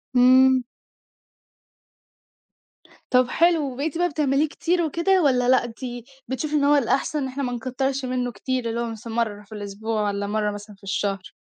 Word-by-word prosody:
امم. 255 Hz, +1 st, +6 dB, 2.5 s
طَب 250 Hz, -1 st, +4 dB
حلو، 330 Hz, -5 st, +2 dB
وبقيتِ 285 Hz, +5 st, -3 dB
بقى 355 Hz, 0 st, +2 dB
بتعمليه 290 Hz, 0 st, +1 dB
كتير 345 Hz, +4 st, 0 dB
وكده 340 Hz, +3 st, +2 dB
والّا 250 Hz, -3 st, +3 dB
لأ، 260 Hz, -1 st, +5 dB
انتي 240 Hz, 0 st, -7 dB, 0.2 s
بتشوفي 265 Hz, +5 st, -3 dB
إن 285 Hz, -, +2 dB
هو 290 Hz, +1 st, +5 dB
الأحسَن 280 Hz, +3 st, +1 dB
إن 265 Hz, -, -2 dB
إحنا 270 Hz, +2 st, -4 dB
ما 245 Hz, -, -2 dB
نكتّرش 260 Hz, +3 st, -2 dB
منُّه 250 Hz, -1 st, -2 dB
كتير، 250 Hz, +2 st, -3 dB
اللي 230 Hz, +1 st, -2 dB
هو 235 Hz, -, -2 dB
مثلًا 225 Hz, 0 st, -7 dB
مرّة 215 Hz, -3 st, -1 dB
في 210 Hz, -, -27 dB
الأسبوع 210 Hz, +2 st, -3 dB
والّا 200 Hz, 0 st, -2 dB
مرّة 210 Hz, 0 st, 0 dB
مثلًا 205 Hz, 0 st, -9 dB
في 200 Hz, -, -31 dB
الشهر؟ 195 Hz, -1 st, -3 dB
255 Hz, 165 wpm, -23 LUFS, 225-280 Hz, 2.5 s, امم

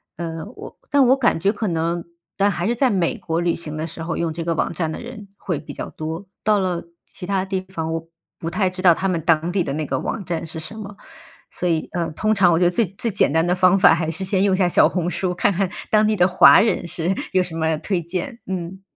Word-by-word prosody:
呃， 165 Hz, -1 st, -5 dB
我 -, -, -10 dB
但 285 Hz, -2 st, +4 dB
我 265 Hz, +2 st, +5 dB
感 240 Hz, -9 st, +2 dB
觉 195 Hz, +5 st, +2 dB
可 215 Hz, 0 st, -3 dB
能 170 Hz, 0 st, -1 dB, 0.3 s
但 200 Hz, +1 st, +3 dB
还 175 Hz, +1 st, -2 dB
是 240 Hz, -, +2 dB
在 260 Hz, +2 st, +2 dB
美 185 Hz, -6 st, 0 dB
国 165 Hz, 0 st, -2 dB
旅 170 Hz, -1 st, +1 dB
行 155 Hz, -2 st, -3 dB
的 155 Hz, -, -2 dB
时 165 Hz, 0 st, -7 dB
候， 165 Hz, +1 st, -3 dB
用 165 Hz, -2 st, -1 dB
这 165 Hz, 0 st, -4 dB
个 165 Hz, -1 st, -1 dB
网 -, -, 0 dB
站 160 Hz, -1 st, -2 dB
的 -, -, -6 dB
人 235 Hz, -4 st, -9 dB
会 170 Hz, -6 st, -3 dB
比 150 Hz, -, -9 dB
较 -, -, -6 dB
多， 160 Hz, +4 st, -6 dB, 0.2 s
到 210 Hz, -1 st, +3 dB
了 180 Hz, -3 st, -1 dB, 0.2 s
其 180 Hz, -, -8 dB
它 195 Hz, -1 st, 0 dB
地 190 Hz, -1 st, -2 dB
方， 160 Hz, -3 st, -3 dB
我 165 Hz, 0 st, -4 dB, 0.3 s
不 165 Hz, -, -3 dB
太 190 Hz, +1 st, 0 dB
知 185 Hz, 0 st, -7 dB
道 175 Hz, -3 st, +7 dB
他 195 Hz, -, -1 dB
们 170 Hz, -3 st, -1 dB
当 165 Hz, 0 st, +2 dB
地 185 Hz, -1 st, +1 dB
的 140 Hz, -, -3 dB
那 155 Hz, 0 st, -2 dB
个 130 Hz, -1 st, -2 dB
网 200 Hz, -, -4 dB
站 170 Hz, -1 st, -3 dB
是 160 Hz, 0 st, -6 dB
什 185 Hz, +7 st, -5 dB
么。 205 Hz, -1 st, -9 dB, 0.5 s
所 180 Hz, -, -2 dB
以， 160 Hz, -1 st, -1 dB
呃， 170 Hz, -2 st, -2 dB
通 215 Hz, +7 st, 0 dB
常 190 Hz, -4 st, +4 dB
我 165 Hz, -, +3 dB
觉 180 Hz, -, +3 dB
得 175 Hz, -, +4 dB
最 225 Hz, +4 st, +2 dB
最 230 Hz, -, -1 dB
简 185 Hz, -, +2 dB
单 160 Hz, +2 st, +2 dB
的 175 Hz, -, +2 dB
方 185 Hz, +1 st, +4 dB
法 190 Hz, -4 st, +7 dB
还 160 Hz, -1 st, -1 dB
是 165 Hz, +4 st, -1 dB
先 190 Hz, 0 st, +1 dB
用 195 Hz, -2 st, +3 dB
一 -, -, -3 dB
下 185 Hz, -2 st, +3 dB
小 -, -, +5 dB
红 180 Hz, -1 st, -2 dB
书， 180 Hz, -2 st, -2 dB
看 200 Hz, +2 st, +2 dB
看 190 Hz, 0 st, 0 dB, 0.2 s
当 215 Hz, 0 st, +4 dB
地 215 Hz, -, +2 dB
的 180 Hz, -2 st, +4 dB
华 180 Hz, 0 st, +7 dB
人 215 Hz, -5 st, 0 dB
是 170 Hz, +3 st, -1 dB, 0.2 s
有 185 Hz, -1 st, +3 dB
什 175 Hz, -, -7 dB
么 160 Hz, -1 st, 0 dB
推 180 Hz, +3 st, -2 dB
荐， 180 Hz, +7 st, -4 dB
嗯。 190 Hz, 0 st, -5 dB
180 Hz, 290 characters per minute, -21 LUFS, 165-195 Hz, 0.5 s, 道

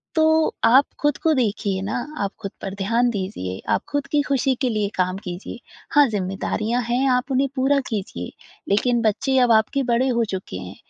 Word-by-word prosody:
तो 315 Hz, 0 st, +3 dB
आप 260 Hz, +5 st, +6 dB, 0.2 s
ख़ुद 295 Hz, -1 st, +2 dB
को 320 Hz, -1 st, +4 dB
देखिए 205 Hz, -6 st, 0 dB
ना, 215 Hz, +5 st, -3 dB, 0.2 s
आप 200 Hz, -, -2 dB
ख़ुद 195 Hz, -3 st, -5 dB
पर 195 Hz, -, -5 dB
ध्यान 235 Hz, +4 st, +2 dB
दीजिए, 185 Hz, -, -4 dB
आप -, -, +1 dB
ख़ुद 285 Hz, -1 st, -1 dB
की 295 Hz, -1 st, +3 dB
ख़ुशी 270 Hz, -2 st, +1 dB
के 255 Hz, -, +2 dB
लिए 210 Hz, -2 st, 0 dB
काम 185 Hz, 0 st, 0 dB
कीजिए। 180 Hz, +6 st, -7 dB, 0.4 s
हाँ 290 Hz, -2 st, +7 dB
ज़िम्मेदारियाँ 210 Hz, +4 st, -1 dB
हैं 255 Hz, +3 st, +2 dB
आप 250 Hz, +2 st, +1 dB
उन्हें 270 Hz, +1 st, +2 dB
पूरा 275 Hz, +2 st, +2 dB
कीजिए 190 Hz, -, -4 dB, 0.4 s
लेकिन 235 Hz, +4 st, +2 dB
बच्चे 235 Hz, +5 st, +1 dB
अब 245 Hz, -2 st, +4 dB
आपके 225 Hz, +5 st, +3 dB
बड़े 245 Hz, +3 st, +2 dB
हो 235 Hz, -1 st, +2 dB
चुके 185 Hz, -, -5 dB
हैं। 90 Hz, +1 st, -8 dB
235 Hz, 185 wpm, -22 LUFS, 195-270 Hz, 0.4 s, हाँ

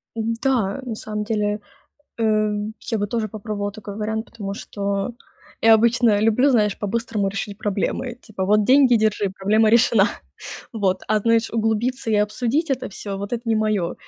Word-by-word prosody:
М, 225 Hz, 0 st, -1 dB
да, 250 Hz, -5 st, +1 dB
на 235 Hz, -4 st, -4 dB
самом 210 Hz, 0 st, -4 dB
деле, 210 Hz, -1 st, -1 dB, 0.6 s
э, 215 Hz, -1 st, +2 dB, 0.4 s
я 225 Hz, -, +1 dB
бы 205 Hz, -, 0 dB
тоже 220 Hz, 0 st, -2 dB
попробовала 205 Hz, -1 st, -4 dB
такой 205 Hz, -2 st, -8 dB
вариант, 220 Hz, +1 st, -3 dB
потому 200 Hz, -4 st, -6 dB
что 200 Hz, +2 st, -3 dB, 0.5 s
я 225 Hz, 0 st, +7 dB
обычно 225 Hz, -1 st, +3 dB
люблю, 225 Hz, +6 st, +3 dB
знаешь, 210 Hz, -5 st, +2 dB
по-быстрому 215 Hz, -1 st, -1 dB
решить 200 Hz, +1 st, -5 dB
проблемы: 215 Hz, +5 st, -2 dB
типа: 200 Hz, -4 st, -5 dB
"Вот 210 Hz, +2 st, +3 dB
деньги, 260 Hz, 0 st, +5 dB
держи, 210 Hz, -2 st, +1 dB
проблема 215 Hz, +3 st, +3 dB
решена". 225 Hz, -3 st, +5 dB, 0.6 s
Вот. 190 Hz, -4 st, 0 dB
А, 215 Hz, 0 st, +3 dB
знаешь, 230 Hz, +1 st, +2 dB
углубиться 225 Hz, +2 st, -1 dB
и 215 Hz, -, +3 dB
обсудить 240 Hz, +9 st, 0 dB
это 265 Hz, -, -1 dB
всё- 200 Hz, 0 st, -6 dB
вот 200 Hz, +3 st, -6 dB
это 235 Hz, -, -2 dB
не 225 Hz, -, +3 dB
моё. 215 Hz, -5 st, 0 dB
215 Hz, 165 wpm, -22 LUFS, 205-230 Hz, 0.6 s, я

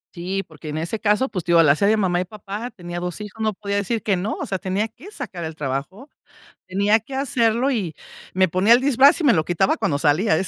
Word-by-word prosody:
Sí, 185 Hz, +3 st, -3 dB
porque 155 Hz, -1 st, -10 dB
en 150 Hz, -, -4 dB
ese 170 Hz, +7 st, -3 dB
caso, 210 Hz, +5 st, +1 dB
pues, 185 Hz, -9 st, -4 dB
te 175 Hz, -, -2 dB
digo: 170 Hz, -1 st, +7 dB
"La 150 Hz, -3 st, +5 dB
hace 200 Hz, +7 st, +1 dB
de 220 Hz, +1 st, +3 dB
mamá 180 Hz, -4 st, +1 dB
y -, -, -1 dB
papá, 210 Hz, +4 st, -7 dB
tenía 175 Hz, -4 st, -7 dB
2 180 Hz, +1 st, -4 dB
hijos, 210 Hz, +1 st, -8 dB
no 215 Hz, -, +2 dB
podía 200 Hz, +1 st, -4 dB
decir 210 Hz, +3 st, -1 dB
que 200 Hz, -1 st, +1 dB
no". 190 Hz, +4 st, -2 dB
O -, -, -5 dB
sea, 190 Hz, -, -3 dB
tenía 195 Hz, +4 st, -1 dB
que 255 Hz, -, -14 dB
sacar 200 Hz, -, -7 dB
el 160 Hz, 0 st, -6 dB
trabajo, 145 Hz, -, -4 dB, 0.6 s
tenía 200 Hz, +4 st, +2 dB
que 240 Hz, +5 st, -12 dB
hacerlo, 255 Hz, -2 st, +1 dB
y 205 Hz, -, -2 dB, 0.4 s
me 185 Hz, 0 st, +3 dB
ponía 185 Hz, +6 st, +2 dB
el 240 Hz, -, +8 dB
disfraz 275 Hz, +3 st, +5 dB
y 325 Hz, -, -1 dB
me 260 Hz, -, +6 dB
lo 160 Hz, -4 st, +2 dB
quitaba 175 Hz, +4 st, +1 dB
cuando 140 Hz, -2 st, -1 dB
salía. 160 Hz, +4 st, +2 dB
200 Hz, 245 wpm, -22 LUFS, 175-225 Hz, 0.6 s, el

